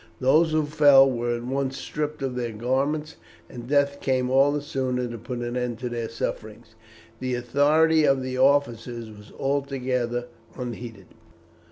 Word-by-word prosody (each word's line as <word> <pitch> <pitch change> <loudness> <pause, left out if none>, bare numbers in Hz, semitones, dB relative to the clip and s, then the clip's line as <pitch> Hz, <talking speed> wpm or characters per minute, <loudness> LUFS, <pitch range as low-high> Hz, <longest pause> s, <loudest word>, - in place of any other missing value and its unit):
Those 155 +5 +4
who 155 -1 +1
fell 145 -3 +6
were 120 -1 -1
at 120 - -8
once 135 +1 -2
stripped 150 -1 -4
of 130 -2 -2
their 120 -2 -3
garments, 140 +7 -1 0.3
and 120 +3 -9
death 140 0 +1
came 130 -1 0
all 135 +2 +5
the 150 - -1
sooner 130 -4 -2
to 120 0 -6
put 120 +2 -6
an 120 0 -4
end 125 -2 -2
to 125 +1 -4
their 115 -1 -4
sufferings. 110 0 -6 0.5
The 130 -1 -2
authority 150 +6 +3
of 135 -2 +2
the 130 0 -4
officers 120 -4 +1
was 105 +1 -15
altogether 130 -3 -1 0.3
unheeded. 120 -5 -7
130 Hz, 160 wpm, -25 LUFS, 120-140 Hz, 0.5 s, fell